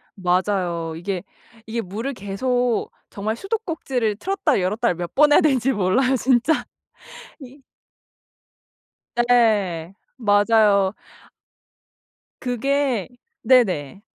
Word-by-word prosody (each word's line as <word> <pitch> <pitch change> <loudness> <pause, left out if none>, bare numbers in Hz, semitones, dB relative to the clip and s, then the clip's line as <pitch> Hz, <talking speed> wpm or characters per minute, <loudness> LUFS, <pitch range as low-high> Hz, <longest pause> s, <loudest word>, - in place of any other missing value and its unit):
맞아요. 180 -3 -1
이게 180 +2 -4 0.4
이게 230 +1 -3
물을 225 +8 -5
계속 245 +3 -1 0.2
정말 215 +2 -3
수도꼭지를 295 - -2
틀었다 355 - 0
열었다를 210 +3 0
몇 175 0 -6
번 295 +1 +5
해야 - - +6
되는지 270 -4 +2
몰라요 230 +7 +2
진짜. 260 +4 +1 0.7
이 270 0 -14 1.5
네. 210 -8 +2 0.2
맞아요. 205 -3 +3 1.5
그게 260 -2 -1 0.3
네네. 195 - +2
225 Hz, 195 characters per minute, -22 LUFS, 195-260 Hz, 1.5 s, 해야